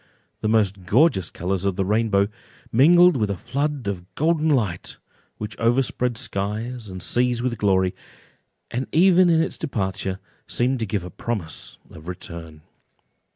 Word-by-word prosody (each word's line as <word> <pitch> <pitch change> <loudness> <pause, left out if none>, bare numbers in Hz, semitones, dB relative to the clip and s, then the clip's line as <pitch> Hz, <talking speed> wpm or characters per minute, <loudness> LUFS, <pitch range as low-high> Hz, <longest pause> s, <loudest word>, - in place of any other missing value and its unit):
The - - -1
most 100 -4 +1
gorgeous 115 - +3
colours 90 +1 -2
of 100 -2 0
the 95 0 0
rainbow 105 -1 +2 0.4
mingled 175 +7 +6
with 110 -5 0
a 100 - -2
flood 140 - -2
of 95 -2 -5
golden 160 0 +2
light, 105 - -1 0.4
which 105 -1 -6
overspread 120 0 +1
skies 110 +1 -3
and 95 -2 -6
seas 120 -1 +1
with 120 -3 -2
glory, 95 -3 +2 0.8
and 125 +3 -2
even 180 +1 +5
in 165 -1 +4
its - - -5
departure 95 -8 -2 0.3
seemed 125 +1 +1
to 110 - -2
give 100 -2 -2
a 90 - -8
promise 95 -10 -5
of 80 +2 -12
return. 85 -4 -8
110 Hz, 150 wpm, -23 LUFS, 95-130 Hz, 0.8 s, mingled